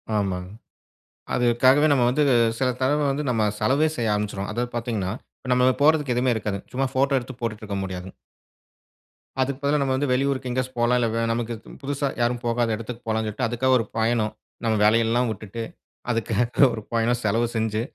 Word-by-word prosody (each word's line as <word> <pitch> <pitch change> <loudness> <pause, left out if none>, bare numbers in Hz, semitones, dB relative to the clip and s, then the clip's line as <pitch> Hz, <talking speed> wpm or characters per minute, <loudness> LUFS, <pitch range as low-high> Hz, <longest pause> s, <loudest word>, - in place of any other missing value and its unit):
ஆமாங்க. 95 -3 -1 0.9
அதற்காகவே 130 +4 +4
நம்ப 130 -3 +3
வந்து 150 +4 +1 0.4
சில 130 - +1
தடவ 145 +3 +2
வந்து 145 +2 -2
நம்ப 115 -3 +1 0.2
செலவே 150 +4 +3
செய்ய 115 -3 0
ஆரமிச்சிடுவோம். 105 -1 -3
அதாவது 120 +2 -2
பாத்தீங்கன்னா, 110 -5 -2 0.3
இப்ப 125 - -6
நம்ப 125 +1 +4
போடுறதுக்கு 150 -4 +3
எதுவுமே 125 0 +2
இருக்காது. 105 -2 -2
சும்மா 135 +2 0
போட்டோ 135 +1 +3
எடுத்து 130 0 -8
போட்டுட்டு 115 -2 -3
இருக்க 100 -2 -3
முடியாதுங்க. 95 0 -6 1.3
அதுக்கு 135 +1 -1
பதிலா, 145 +1 +2
நம்ம 135 -1 +1
வந்து 140 0 -1
வெளியூருக்கு 130 0 0
எங்கேயாச்சும் 130 0 -3
போகலாம். 120 +1 +3
இல்ல 115 - +2
வெ 115 - 0
நமக்கு 115 0 -2
பு - - -15
புதுசா 140 +1 -2
யாரும் 120 +1 +1
போகாத 115 -1 +1
இடத்துக்கு 115 +2 -7
போகலாம்னு 110 0 0
சொல்லிட்டு, 115 +4 -1
அதுக்காக 130 +3 +1
ஒரு 115 - -2
பயணம். 110 -1 +1 0.3
நம்ம 110 -1 +2
வேலை 110 +2 +5
எல்லாம் 120 +2 +1
வுட்டுட்டு. 110 +2 -6 0.5
அதற்காக 115 +3 +2
ஒரு 110 - -5
பயணம் 115 +1 +1
செலவு 115 +3 +1
செஞ்சி, 110 -1 0
120 Hz, 175 wpm, -24 LUFS, 110-130 Hz, 1.3 s, வேலை